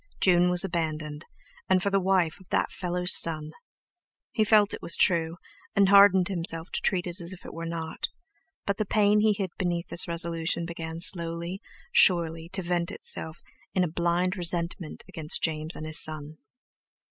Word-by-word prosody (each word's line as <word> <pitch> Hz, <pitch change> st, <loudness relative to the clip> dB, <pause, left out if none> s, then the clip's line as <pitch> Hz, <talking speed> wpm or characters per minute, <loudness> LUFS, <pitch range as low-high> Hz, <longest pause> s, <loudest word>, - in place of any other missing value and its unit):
June 180 Hz, -1 st, +3 dB
was 180 Hz, 0 st, +5 dB
abandoned, 155 Hz, -4 st, -4 dB, 0.4 s
and 185 Hz, -1 st, +2 dB
for 200 Hz, -, -1 dB
the 195 Hz, -, +2 dB
wife 185 Hz, -3 st, 0 dB
of 190 Hz, -, -20 dB
that -, -, -1 dB
fellow's 180 Hz, -1 st, +1 dB
son! 155 Hz, -2 st, +4 dB, 0.8 s
He 220 Hz, -, 0 dB
felt 210 Hz, -1 st, +3 dB
it -, -, -7 dB
was 170 Hz, -, +1 dB
true, 165 Hz, -1 st, +1 dB, 0.4 s
and 200 Hz, -1 st, +3 dB
hardened 200 Hz, -2 st, +5 dB
himself 170 Hz, -3 st, -2 dB
to -, -, -4 dB
treat 185 Hz, -3 st, -1 dB
it 175 Hz, +1 st, -6 dB
as 170 Hz, +1 st, -4 dB
if 185 Hz, -, -15 dB
it -, -, -10 dB
were 165 Hz, 0 st, -7 dB
not; 165 Hz, -1 st, -5 dB, 0.6 s
but 200 Hz, 0 st, -2 dB
the -, -, -1 dB
pain 210 Hz, +1 st, +2 dB
he 215 Hz, 0 st, +2 dB
hid 195 Hz, -3 st, -5 dB
beneath 175 Hz, -1 st, -3 dB
this 175 Hz, -, +4 dB
resolution 170 Hz, 0 st, 0 dB
began 165 Hz, -1 st, -7 dB
slowly, 170 Hz, +1 st, +1 dB, 0.3 s
surely, 165 Hz, -2 st, +2 dB
to 190 Hz, +1 st, -4 dB
vent 175 Hz, 0 st, -2 dB
itself 160 Hz, -5 st, -2 dB, 0.3 s
in 185 Hz, -, +2 dB
a -, -, 0 dB
blind 175 Hz, +2 st, -1 dB
resentment 170 Hz, -2 st, -4 dB
against 155 Hz, -1 st, -1 dB
James 155 Hz, 0 st, -1 dB
and 155 Hz, -, -8 dB
his 155 Hz, 0 st, +4 dB
son. 155 Hz, 0 st, -3 dB
170 Hz, 175 wpm, -26 LUFS, 165-185 Hz, 0.8 s, was